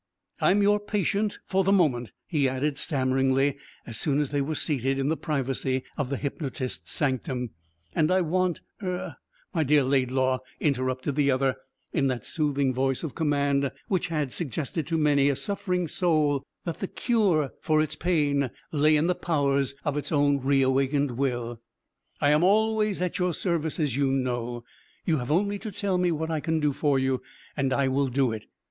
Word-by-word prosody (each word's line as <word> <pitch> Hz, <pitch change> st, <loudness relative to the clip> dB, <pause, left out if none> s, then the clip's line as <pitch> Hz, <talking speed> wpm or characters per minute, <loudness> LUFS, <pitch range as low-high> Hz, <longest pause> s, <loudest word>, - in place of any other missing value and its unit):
"I'm 205 Hz, +2 st, +4 dB
your 205 Hz, +1 st, +4 dB
patient 205 Hz, 0 st, -1 dB
for 190 Hz, 0 st, +1 dB
the 195 Hz, -, +2 dB
moment," 130 Hz, -, +2 dB
he 145 Hz, -5 st, +1 dB
added 140 Hz, +2 st, -1 dB
stammeringly 135 Hz, 0 st, +1 dB, 0.3 s
as 115 Hz, -2 st, -3 dB
soon 145 Hz, -1 st, +1 dB
as 145 Hz, -3 st, -1 dB
they 145 Hz, -1 st, +1 dB
were 155 Hz, +3 st, -2 dB
seated 135 Hz, -3 st, 0 dB
in 135 Hz, +1 st, 0 dB
the 160 Hz, -, +2 dB
privacy 135 Hz, -4 st, -1 dB
of 140 Hz, -4 st, -2 dB
the 140 Hz, -, -1 dB
hypnotist's 135 Hz, -2 st, -4 dB
sanctum, 130 Hz, -4 st, -1 dB, 0.4 s
"and 155 Hz, 0 st, +2 dB
I 185 Hz, +1 st, +3 dB
want 180 Hz, +1 st, 0 dB, 0.2 s
er 180 Hz, -5 st, -4 dB, 0.2 s
" -, -, -36 dB
"My 165 Hz, -4 st, +2 dB
dear 145 Hz, 0 st, +4 dB
Laidlaw," 130 Hz, -1 st, +1 dB, 0.2 s
interrupted 130 Hz, -1 st, 0 dB
the 145 Hz, -1 st, +3 dB
other, 135 Hz, 0 st, +2 dB, 0.4 s
in 140 Hz, -5 st, +2 dB
that 125 Hz, -2 st, -2 dB
soothing 140 Hz, -4 st, 0 dB
voice 135 Hz, +2 st, 0 dB
of 155 Hz, -, -4 dB
command 140 Hz, -3 st, +1 dB, 0.2 s
which 185 Hz, -2 st, +1 dB
had 150 Hz, -5 st, -1 dB
suggested 155 Hz, +1 st, -3 dB
to 165 Hz, -1 st, 0 dB
many 145 Hz, -2 st, +3 dB
a 140 Hz, -, +1 dB
suffering 180 Hz, -1 st, -1 dB
soul 150 Hz, -5 st, +1 dB, 0.2 s
that 170 Hz, -2 st, -4 dB
the 195 Hz, -, -2 dB
cure 190 Hz, -, +1 dB
for 155 Hz, -1 st, +2 dB
its 155 Hz, -1 st, 0 dB
pain 145 Hz, -5 st, +1 dB, 0.2 s
lay 155 Hz, 0 st, +4 dB
in 150 Hz, -, +2 dB
the 180 Hz, -, +3 dB
powers 140 Hz, -5 st, 0 dB
of 150 Hz, -1 st, 0 dB
its 145 Hz, -, -3 dB
own 145 Hz, -2 st, +3 dB
reawakened 135 Hz, +1 st, +2 dB
will, 120 Hz, -2 st, -2 dB, 0.6 s
"I 145 Hz, -, +3 dB
am 150 Hz, +3 st, +4 dB
always 215 Hz, 0 st, +2 dB
at 180 Hz, -, -2 dB
your 180 Hz, -2 st, +1 dB
service, 165 Hz, -3 st, -1 dB
as 145 Hz, -6 st, 0 dB
you 140 Hz, -1 st, +2 dB
know. 120 Hz, -3 st, -2 dB, 0.4 s
You 160 Hz, -4 st, +2 dB
have 125 Hz, -, -5 dB
only 200 Hz, +6 st, +1 dB
to 215 Hz, 0 st, -6 dB
tell 195 Hz, -2 st, -1 dB
me 180 Hz, -1 st, +2 dB
what 160 Hz, 0 st, -2 dB
I 160 Hz, -, 0 dB
can 160 Hz, +1 st, 0 dB
do 150 Hz, -2 st, +1 dB
for 145 Hz, -1 st, +1 dB
you, 130 Hz, -1 st, 0 dB, 0.3 s
and 135 Hz, -2 st, 0 dB
I 135 Hz, +1 st, +2 dB
will 135 Hz, +1 st, +1 dB
do 130 Hz, -1 st, +1 dB
it." 110 Hz, -1 st, -6 dB
145 Hz, 185 wpm, -27 LUFS, 135-165 Hz, 0.6 s, I'm